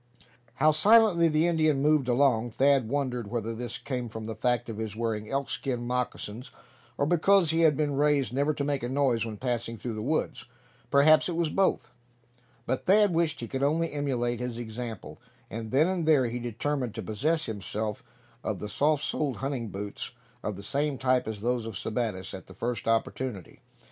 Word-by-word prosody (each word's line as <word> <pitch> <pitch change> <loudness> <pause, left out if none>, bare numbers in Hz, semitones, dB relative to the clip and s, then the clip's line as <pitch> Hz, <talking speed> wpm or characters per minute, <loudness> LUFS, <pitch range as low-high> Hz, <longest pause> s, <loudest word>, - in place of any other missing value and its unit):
How 155 +3 +4
silently 195 +1 +5
the 155 +1 +2
Indian 155 -4 +2
moved 150 -2 +3
along. 120 -2 +3
Thad 135 -2 +3
wondered 125 -5 -2
whether 115 0 -2
this 120 +1 -5
came 125 -3 -4
from 110 0 -7
the 110 - -4
fact 120 +2 0
of 110 -2 -6
his 110 -2 -4
wearing 110 -2 -2
elkskin 125 -1 -2
moccasins, 125 -1 -3 0.5
or 140 - +1
because 175 +1 +4
he 165 - +1
had 160 -4 +4
been 145 -2 0
raised 145 -3 +2
never 140 +3 +2
to 140 - -2
make 140 -1 -1
a 120 - -3
noise 130 -4 +1
when 110 -2 -6
passing 120 -2 -2
through 115 +2 -5
the 110 - -4
woods; 150 +8 -1 0.4
perhaps 155 +4 +5
it 170 - -2
was 165 -2 0
both; 195 -1 +1 0.7
but 130 - -2
Thad 205 0 +5
wished 165 -3 0
he 115 - -4
could 135 +2 -4
only 160 +4 +1
emulate 125 -5 -1
his 125 -2 -4
example; 115 -2 -7 0.3
and 110 0 -5
then 140 +7 +4
and 180 -4 -1
there 145 -5 +5
he 120 +1 -3
determined 120 +1 -2
to - - -4
possess 155 +9 0
himself 105 0 -4 0.4
of 110 - -2
the 105 - -6
soft 150 +6 +1
soled 140 -7 -1
hunting 130 0 -3
boots 100 +1 -6 0.3
of 105 - -3
the 100 - -9
same 140 +5 -1
type 130 -2 +1
as 110 -2 -5
those 120 0 -1
of 115 - -6
Sebattis, 110 -5 -3
at 95 - -9
the 95 - -13
first 120 +3 -3
opportunity. 115 -3 -2
125 Hz, 190 wpm, -28 LUFS, 115-150 Hz, 0.7 s, silently